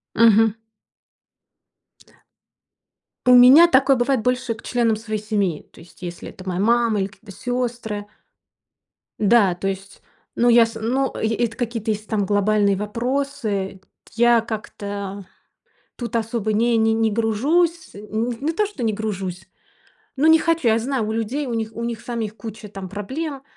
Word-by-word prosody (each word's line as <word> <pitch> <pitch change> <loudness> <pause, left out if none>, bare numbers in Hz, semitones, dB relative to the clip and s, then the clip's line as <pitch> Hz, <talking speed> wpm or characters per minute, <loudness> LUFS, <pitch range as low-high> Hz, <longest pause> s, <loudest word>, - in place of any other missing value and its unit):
Мгм. 225 -1 +5 2.7
У 250 - +8
меня 260 +8 +9
такое 275 -3 +4
бывает 245 -2 +1
больше 250 -2 0
к 220 - -15
членам 235 -3 +1
своей 215 -1 -4
семьи. 200 -7 -1
То - - -18
есть 165 +2 -17
если 175 -1 -7
это 185 0 -12
моя 180 0 -2
мама 230 0 +2
или 190 - 0
какие-то 200 +1 -15
сёстры. 240 -2 -3 1.1
Да, 210 -3 +4
то 185 +2 -3
есть, 195 +1 -7 0.3
ну, 240 +1 +2
я 235 0 +7
с 225 0 -6
ну, 260 +5 0
эт 220 - -2 0.2
это - - -13
какие-то 230 -3 -3
если 210 0 -3
там 210 -3 -1
глобальные 205 0 +2
вопросы. 215 -3 -3 0.3
Я 235 0 +4
как-то 205 -3 -6 0.7
тут 235 -2 -5
особо 225 -1 -1
не 230 +2 +2
не 220 0 +3
не 225 -1 +1
гружусь. 290 +11 +1
Н 215 +3 -3
не 310 +4 -1
то 420 +6 +1
что 405 -10 -8
не 220 - +1
гружусь, 195 -4 -5 0.7
но 285 +4 +2
не 320 0 +7
хочу. 330 -4 0
Я 220 0 +3
знаю, 250 -2 -2
у 220 - -2
людей, 235 +6 -2
у 240 - -3
них 225 -1 -2
у 235 +1 -5
них 235 -1 -4
самих 225 -3 -5
куча 220 -1 -9
там 195 -2 -8
проблем, 265 - -5
225 Hz, 160 wpm, -21 LUFS, 205-245 Hz, 2.7 s, меня